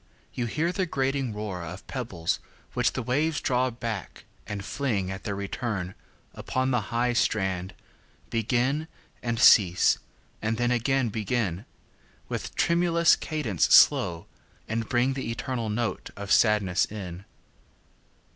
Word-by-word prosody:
you 120 -2 -2
hear 160 +9 0
the 185 0 -1
grating 135 -3 -1
roarOf 95 -4 -6
pebbles 95 -11 -2 0.3
which 125 -2 +1
the 130 - -3
waves 150 +6 +1
draw 130 0 +1
back, 115 -4 -6 0.2
and 100 -1 -5
fling, 105 -10 -1
At 95 +1 -7
their 100 - -2
return, 100 -2 -3 0.4
up - - -10
the 130 -2 +1
high 120 +1 +1
strand, 95 -5 0 0.6
Begin, 125 +7 0 0.3
and 115 -1 -2
cease, 95 -6 +6 0.4
and 110 +1 -1
then 120 +1 +1
again 125 +1 +1
begin, 105 -3 -2 0.6
With - - -4
tremulous 170 0 +4
cadence 130 - -1
slow, 85 -3 +5 0.4
and 115 0 -2
bringThe 130 +2 +1
eternal 115 -1 -3
note 110 -2 -2
of 100 0 -5
sadness 105 -5 +4
in. 95 -3 -7
115 Hz, 125 wpm, -27 LUFS, 100-130 Hz, 0.6 s, cease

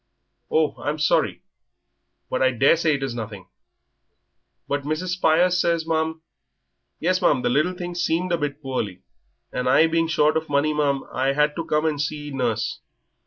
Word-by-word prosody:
"Oh, 155 -1 +1
I'm 150 +1 -2
sorry. 150 -1 +1 0.8
But 130 - -2
I 130 - +5
daresay 150 +5 +3
it 140 - -4
is 135 -3 -2
nothing." 105 -5 -7 1.2
"But 145 0 -1
Mrs. 155 +5 -3
Spires 180 0 +3
says, 170 -1 +1
ma'am 160 0 -1 0.4
" - - -53 0.3
"Yes, 185 +3 +1
ma'am, 130 -7 +3
the - - +2
little 155 +7 +2
thing 175 -1 -5
seemed 175 +1 0
a 170 - +2
bit 145 0 -4
poorly, 105 -9 -4 0.5
and 125 0 -1
I 155 - +6
being 165 0 +1
short 155 -1 +2
of 160 0 -4
money, 145 +2 +2
ma'am, 140 -2 0
I 135 +1 +1
had 150 +1 +2
to 165 - -3
come 150 +1 0
and 150 -2 0
see 150 0 -4
nurse. 125 -5 -1
150 Hz, 170 wpm, -23 LUFS, 135-165 Hz, 1.2 s, I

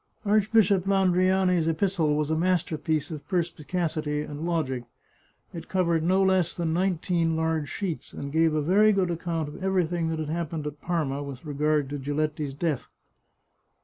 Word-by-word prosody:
Archbishop 205 -2 +3
Landriani's 185 -2 +3
epistle 165 -2 +1
was 150 0 0
a - - +2
masterpiece 160 -3 0
of 150 -2 -7
perspicacity 165 -3 -1
and 150 +1 -7
logic. 135 -8 -1 0.7
It 170 - -8
covered 170 -3 +1
no 185 +4 +3
less 190 -3 +2
than 165 -2 -1
nineteen 175 -2 +1
large 160 -2 -1
sheets, 185 -6 -4
and 140 - -6
gave 160 0 +3
a 150 - +1
very 210 +6 +5
good 185 -3 +1
account 165 -2 -2
of 150 +6 -9
everything 175 -3 +1
that 160 0 -2
had 155 -1 -3
happened 160 -1 -3
at 150 0 -6
Parma 150 -6 -1
with 140 0 -8
regard 150 0 +1
to 145 - -3
Giletti's 145 0 -2
death. 150 -3 -2
165 Hz, 155 wpm, -26 LUFS, 150-180 Hz, 0.7 s, very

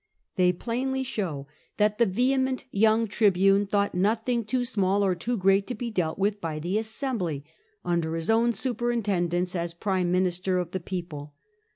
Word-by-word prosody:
They 180 -1 +4
plainly 255 +7 -2
show 180 - -3 0.3
that 210 +1 +2
the 235 - +5
vehement 260 +6 +1
young 220 +2 +3
tribune 195 -1 +3
thought 200 0 +1
nothing 225 +5 +1
too 245 +3 0
small 200 -3 +1
or 190 - +2
too 230 +8 -2
great 195 +1 +3
to 250 - -3
be 235 +2 -4
dealt 170 -6 -1
with 205 +1 0
by 160 -2 -3
the 175 +7 -1
assembly, 220 - -3 0.4
under 170 -2 0
his 165 -1 -4
own 230 +2 +3
superintendence 200 -7 -1
as 170 -1 -3
prime 185 -1 0
minister 180 0 +1
of 175 -1 -2
the 185 - -2
people. 170 -5 -6
195 Hz, 165 wpm, -26 LUFS, 180-230 Hz, 0.4 s, the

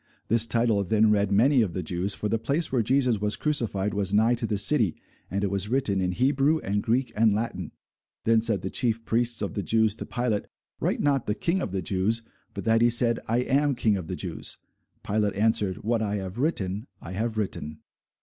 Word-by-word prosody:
This 115 0 +4
title 115 -4 +1
then 110 +3 +3
read 100 -1 +1
many 125 +6 +4
of 100 -6 -1
the 90 - -3
Jews: 90 +5 -2
for 105 - -3
the 110 +2 0
place 150 +8 -1
where 130 -3 +2
Jesus 125 -2 +1
was 105 0 +2
crucified 110 -9 0
was 100 0 0
nigh 110 +3 +4
to 120 -1 -2
the 105 - -1
city: 105 - +3 0.3
and 100 +1 -2
it 100 - 0
was 100 +1 -2
written 115 -7 +1
in 90 0 -1
Hebrew, 135 - +2
and 105 +1 -1
Greek, 120 +3 0
and 110 +1 +4
Latin. 100 -5 -3 0.5
Then 115 0 +3
said 110 -5 +1
the 95 - -4
chief 115 -2 0
priests 120 +1 +1
of - - -3
the 100 - -2
Jews 110 +1 +2
to - - -8
Pilate, 120 -4 -1 0.3
Write - - -1
not, 140 -3 +1
The 105 - 0
King 170 - -1
of 100 - -3
the 95 -1 -3
Jews; 105 +4 0 0.3
but - - -5
that 115 0 +3
he 120 - +5
said, 120 0 +3
I 115 +2 +1
am 140 +2 +1
King 110 -3 +1
of 90 -4 -5
the - - -4
Jews. - - -5 0.5
Pilate 105 0 0
answered, 105 -3 0
What 115 +1 0
I 105 -1 -1
have 95 +2 -5
written 110 - -1
I 85 - -9
have 110 +3 -3
written. 80 -7 -4
110 Hz, 215 wpm, -26 LUFS, 100-120 Hz, 0.5 s, he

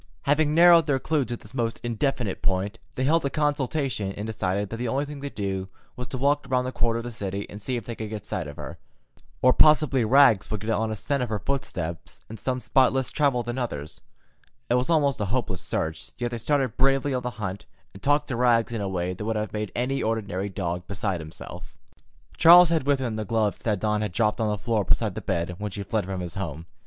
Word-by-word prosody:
Having 150 +1 +2
narrowed 170 -1 +7
their 140 -2 +2
clue 150 0 0
to 120 -1 -4
this 105 - -15
most 115 -3 -1
indefinite 120 -3 -1
point, 95 +2 -1 0.2
they 130 - -1
held 160 +4 +3
a 140 - 0
consultation 140 -7 -1
and 105 - -5
decided 100 -2 -2
that 115 - -5
the 120 +1 -2
only 135 +5 0
thing 145 -1 -8
to 140 - -4
do 95 -4 -3 0.3
was 125 -1 -6
to 130 - -5
walk 145 +3 +1
around 125 -1 +1
that 130 - -2
quarter 115 -1 +1
of 115 - -4
the 120 - -5
city 100 -3 -4
and 105 - -8
see 125 +5 -2
if 115 - -6
they 120 - -5
could 110 -1 -6
get 105 -3 -6
sight 80 - -3
of 75 - -8
her. - - -8 0.6
Or 130 0 +7
possibly 150 -4 +5
Rags 120 -3 +5
would 110 -3 -3
get 110 +1 -2
on 110 0 0
a 110 - -2
scent 140 +5 -1
of 125 - -2
her 110 - -1
footsteps 95 -8 -4
in 110 - -7
some 130 +2 -2
spot 130 0 +3
less 130 -1 -1
travelled 135 -5 +1
than 120 +2 -3
others. 75 - -5 0.7
It - - +5
was 125 +3 +1
almost 145 -7 +2
a - - +1
hopeless 100 -4 -2
search, 80 -1 -3
yet 120 -1 -2
they 120 - -4
started 135 -2 0
bravely 135 +1 +2
on 125 - 0
the 125 - -3
hunt, 100 -2 -5 0.3
and 95 - -12
talked 145 +1 +2
to 130 - -1
Rags 120 -1 +3
in 115 - -2
a 100 - -2
way 90 -1 -2
that 90 - -7
would 110 +1 -1
have 105 0 -3
made 105 -1 -3
an 125 +2 0
ordinary 100 -3 -2
dog 90 -2 -4
beside 95 -2 -2
himself. 80 0 -10 0.6
Charles 175 +1 +9
had 160 -4 0
with 145 -1 +4
him 120 -4 -3
the 110 - -2
gloves 110 0 0
that 105 -4 -1
Dawn 105 0 0
had 105 -4 -3
dropped 110 +2 +1
on 110 - +1
the 105 - -1
floor 110 +1 0
beside - - +1
the - - -5
bed 85 +1 -2
when 105 0 -3
she 100 +1 -5
fled 105 +1 -1
from 95 -1 -4
his 90 -1 -5
home. 85 -5 -5
115 Hz, 240 wpm, -25 LUFS, 100-135 Hz, 0.7 s, Charles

